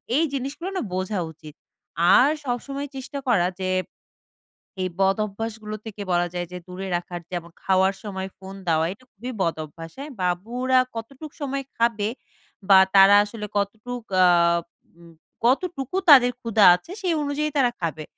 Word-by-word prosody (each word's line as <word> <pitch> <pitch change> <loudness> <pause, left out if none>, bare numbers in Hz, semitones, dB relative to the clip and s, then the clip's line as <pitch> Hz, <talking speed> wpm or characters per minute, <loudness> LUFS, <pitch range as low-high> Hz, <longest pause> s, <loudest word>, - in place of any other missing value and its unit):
এই 310 - +4
জিনিসগুলো 280 +7 -4
না - - -1
বোঝা 185 +2 -2
উচিত। 155 -1 -13 0.6
আর 265 - +6 0.2
সবসময় 275 +3 -3
চেষ্টা 265 +2 -6
করা 180 -8 +3
যে, 185 0 -2 1.1
এই 185 - -1
বদঅভ্যাসগুলো 215 +2 -1
থেকে 215 -2 -8
বলা 175 0 +2
যায় 175 -1 -3
যে, 180 - -6
দূরে 185 +1 -6
রাখার 175 0 -5
যেমন 170 -1 -5
খাওয়ার 190 0 +3
সময় 190 -2 -5
ফোন 190 0 -10
দেওয়া, 160 -1 +2
এটা 255 +6 -22
খুবই 240 +5 -7
বদঅভ্যাস, 165 -1 -4
হ্যাঁ? 290 +2 -7
বাবুরা 235 +9 +1 0.2
কতটুক 270 +7 -8
সময় 275 -1 -2
খাবে? 230 -3 +1 0.6
বা 195 - +9 0.2
তারা 195 +1 +8
আসলে 210 0 -7
কতটুক 220 +4 -3 0.2
আ - - +7 0.7
উম 170 -1 -16 0.3
কতটুকু 275 +4 0
তাদের 250 -3 +8
ক্ষুধা 225 -4 +3
আছে? 180 - -11
সেই 365 -3 +1
অনুযায়ী 290 +1 -1
তারা 250 -3 +3
খাবে, 155 -2 -3
210 Hz, 150 wpm, -24 LUFS, 185-255 Hz, 1.1 s, বা